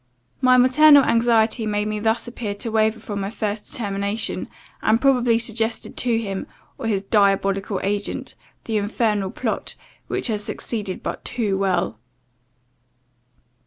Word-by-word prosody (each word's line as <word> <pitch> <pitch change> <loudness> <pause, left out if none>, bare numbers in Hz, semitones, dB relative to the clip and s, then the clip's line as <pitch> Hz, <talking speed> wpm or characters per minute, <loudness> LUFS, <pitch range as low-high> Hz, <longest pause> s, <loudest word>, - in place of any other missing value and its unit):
My 255 -1 +5
maternal 285 +3 +7
anxiety 230 -1 +2
made 210 0 0
me 215 0 -2
thus 225 +2 0
appear 225 -4 -4
to 225 +3 -4
waver 220 0 +2
from 205 -2 -5
my 195 - -2
first 210 -1 -3
determination, 200 -3 -2 0.3
and 220 +1 +3
probably 250 -4 +3
suggested 225 0 -1
to 240 -2 +1
him, 195 -4 -4 0.3
or 240 - -3
his 200 -3 0
diabolical 195 -1 +1
agent, 205 +1 -2 0.3
the 220 -2 -1
infernal 205 -1 0
plot, - - -3 0.3
which - - -2
has 210 -3 -1
succeeded 205 -3 -4
but - - -4
too 215 -5 -1
well. 180 - 0
215 Hz, 135 wpm, -22 LUFS, 200-230 Hz, 0.3 s, maternal